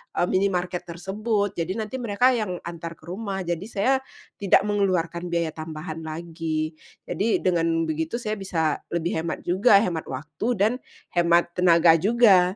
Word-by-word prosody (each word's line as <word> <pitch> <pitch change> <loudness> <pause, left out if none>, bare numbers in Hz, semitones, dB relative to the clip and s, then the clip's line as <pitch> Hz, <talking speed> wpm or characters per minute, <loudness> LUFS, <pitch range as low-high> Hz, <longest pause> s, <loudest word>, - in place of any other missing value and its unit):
eee, - - +2
minimarket 180 -2 0
tersebut, 200 +4 -1
jadi 175 +3 -2
nanti 225 +4 -4
mereka 240 +2 +3
yang 215 -7 -1
antar 170 -1 -6
ke - - -28
rumah, 190 +3 -4
jadi 175 +1 -3
saya 225 +4 +1 0.5
tidak 200 -1 +4
mengeluarkan 185 -4 0
biaya 170 -2 -1
tambahan 155 +1 -6
lagi, 160 -1 -4 0.2
jadi 220 +3 0
dengan 165 -2 +2
begitu 160 +3 -2
saya 215 -3 -3
bisa 160 -6 -1
lebih 170 -1 -1
hemat 165 0 -4
juga, 200 +3 +5
hemat 170 -6 -3
waktu 145 - -5
dan 205 +3 +3 0.4
hemat 170 0 +3
tenaga 170 -2 +6
juga. 195 -4 +5
175 Hz, 150 wpm, -24 LUFS, 165-200 Hz, 0.5 s, tenaga